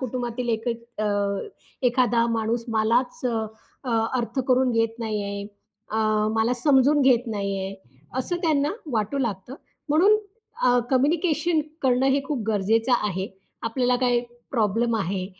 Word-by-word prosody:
कुटुंबातील 245 -1 -3
एक 225 +1 -1
अ, 235 -1 -4 0.8
एखादा 240 -2 +3
माणूस 230 +1 -1
मलाच 230 +3 +1
अ, 235 -2 0 0.8
अर्थ 245 +3 -2
करून 255 0 +4
घेत 225 0 0
नाहीये. 200 -3 -3 0.5
अ, 220 - -1 0.4
मला 225 +2 +2
समजून 290 0 +5
घेत 250 -2 +4
नाहीये. 195 -2 -3 0.4
असं 345 +7 -1
त्यांना 300 -3 +2 0.2
वाटू 220 +4 -1
लागतं. 230 -2 -3 0.3
म्हणून 360 +9 +5 0.5
अ, 245 -1 +5
कम्युनिकेशन 310 +4 +2 0.2
करणं 260 0 +3
हे 280 +1 +2
खूप 295 -4 -2
गरजेचं 220 +4 +2
आहे. 190 -1 -2 0.4
आपल्याला 245 +2 +1
काही 245 -1 +2 0.3
प्रॉब्लेम 230 0 +1
आहे. 185 -1 -2
240 Hz, 125 wpm, -24 LUFS, 220-265 Hz, 0.8 s, समजून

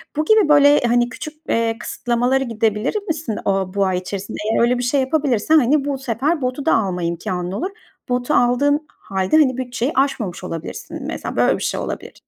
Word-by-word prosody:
Bu 305 +1 0
gibi 430 -4 +4
böyle, 290 0 +6
hani, 240 0 +2
küçük, 275 +6 -7 0.2
eee, 230 0 +1
kısıtlamalara 245 +3 0
gidebilir 225 - -1
misin 305 - -3
o 195 -2 0
bu 200 -1 +2
ay 185 -1 0
içerisinde? 195 +3 -5
Eğer - - +2
öyle 245 +1 +3
bir 245 - -2
şey 265 +3 +2
yapabilirsen, 280 0 +2
hani, 280 +2 +2
bu 285 -1 -1
sefer 270 +5 -1
botu 255 +2 -2
da - - +4
alma 185 -5 -1
imkânın 175 +1 -3
olur. 330 - -2 0.4
Botu 245 0 0
aldığın 285 +5 +2
hâlde, 190 +9 0
hani, 260 -5 +3
bütçeyi 250 +1 -2
aşmamış 240 -10 -1
olabilirsin 165 -3 -6
mesela - - -5
böyle - - +3
bir - - -5
şey - - -1
olabilir. - - -5
245 Hz, 185 wpm, -20 LUFS, 205-285 Hz, 0.4 s, böyle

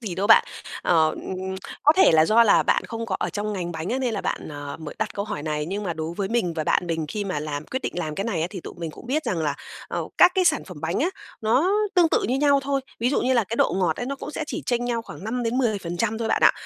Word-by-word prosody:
gì 205 -7 -4
đâu 195 +3 -1
bạn. 225 - +7 0.4
Ờ, 160 -2 +3 0.7
có 300 - +7
thể 380 - +6
là 160 0 +6
do 225 +6 +5
là 210 - +5
bạn - - +2
không 230 0 -5
có 190 - -1
ở - - -1
trong 210 0 -3
ngành 175 -3 -3
bánh 160 +2 -4
á 255 - 0
nên 245 -4 -1
là 200 - -2
bạn, - - -3
ờ, 145 -1 -6
mới 155 - -7
đặt 215 -1 -2
câu 200 - -2
hỏi 145 - -5
này 150 -1 -2
nhưng 200 +4 -3
mà 180 -4 -2
đối 160 +1 -4
với 195 -1 -1
mình 225 -7 0
và 155 -2 -2
bạn 175 - +1
mình 160 -2 -2
khi 205 +3 -3
mà 185 -7 -2
làm 150 -1 -4
quyết 260 +1 -4
định - - -2
làm 155 -3 -3
cái 195 - -2
này 195 -9 -1
á 165 - +1
thì 185 -3 -6
tụi - - -9
mình 165 -2 -5
cũng 240 - -13
biết 300 +4 0
rằng 180 - -1
là, 150 -3 0 0.3
ờ, - - -2
các 360 - +8
cái 375 - +3
sản - - +2
phẩm - - -10
bánh - - -1
á, 365 - +2 0.3
nó 260 - +2 0.2
tương 350 -3 +5
tự - - +2
như 255 - +1
nhau 280 -1 +4
thôi. 275 0 0 0.2
Ví 245 +3 +2
dụ - - +1
như 255 - +2
là 235 -3 +3
cái 230 +4 -4
độ - - +3
ngọt 175 -4 +1
ấy 245 - -4
nó 275 +1 -3
cũng 295 - -7
sẽ 310 - -4
chỉ 320 - -4
chênh 245 -1 0
nhau 235 -1 -1
khoảng 195 - -10
5%-10% 225 -4 -1
thôi 225 -1 -2
bạn - - +1
ạ. - - +7
210 Hz, 295 wpm, -24 LUFS, 165-245 Hz, 0.7 s, các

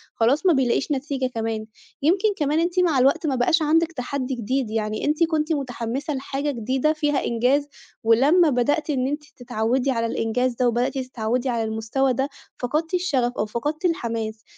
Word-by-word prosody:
خلاص 260 +10 +2
ما 360 - +6
بيلاقيش 265 +1 +1
نتيجة 275 -1 -1
كمان. 225 -1 -2 0.4
يمكن 370 +9 +3
كمان 295 0 +1
أنتِ 345 +2 +1
مع 330 -7 +3
الوقت 280 +6 +3
ما 275 - +1
بقاش 320 +7 +2
عندِك 325 +2 +2
تَحدّي 265 -2 -3
جديد، 245 +1 -1
يعني 215 -1 -2
أنتِ 300 +3 +2
كنتِ 320 -1 +1
مُتحمِّسة 265 +1 -3
لحاجة 275 +2 -2
جديدة 260 +5 0
فيها 295 -2 0
إنجاز 255 +5 +1 0.4
ولمّا 280 +10 +5
بدأتِ 290 +5 +1
إن 260 -3 +1
أنتِ 295 +2 -3
تتعوِّدي 245 +3 0
على 230 -2 0
الإنجاز 235 +2 0
ده 250 +1 +2
وبدأتِ 240 +3 0
تتعوِّدي 255 0 -2
على 235 -2 0
المستوى 220 +5 0
ده، 270 +3 -1 0.3
فقدتِ 305 +7 -2
الشَغف 285 -10 +1
أو 210 - +1
فقدتِ 295 - -3
الحماس. 225 -9 -2
265 Hz, 170 wpm, -23 LUFS, 235-300 Hz, 0.4 s, ما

